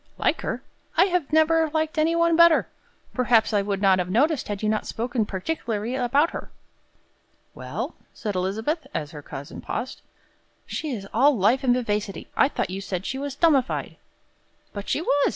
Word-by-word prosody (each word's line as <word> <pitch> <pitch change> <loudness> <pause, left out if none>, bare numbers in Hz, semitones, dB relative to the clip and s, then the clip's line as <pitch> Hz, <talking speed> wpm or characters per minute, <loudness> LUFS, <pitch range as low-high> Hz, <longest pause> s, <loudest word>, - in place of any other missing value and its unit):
"Like - - +1
her? - - -3 0.3
I 340 - +7
have 360 -6 -1
never 315 +1 +4
liked 315 0 0
any 325 +2 +3
one 335 0 +3
better. 335 -1 +6 0.5
Perhaps 235 -3 +3
I 205 - +3
would 200 0 -2
not 190 -1 +5
have 180 0 -2
noticed, 285 - +2
had 205 0 -4
you - - +1
not 215 0 0
spoken 235 -1 -1
particularly 220 +1 -3
about 270 +5 +2
her." - - -7 1.0
"Well?" - - -5 0.2
said 210 -3 -4
Elizabeth, 220 - -2
as 150 -1 -3
her 150 - -8
cousin 140 -1 -8
paused. 255 - -5 0.6
"She 310 - -4
is 210 -7 -5
all 270 +3 +4
life 230 +8 +3
and 245 -2 +4
vivacity. 210 -4 -2
I - - +5
thought 185 - -2
you 195 +1 -4
said 190 -1 -4
she 265 - -3
was 280 -1 -4
'dummified.'" 280 -5 +1 0.8
"But 200 -1 -6
she 310 - 0
was. 285 -4 +3
245 Hz, 175 wpm, -25 LUFS, 205-310 Hz, 1.0 s, I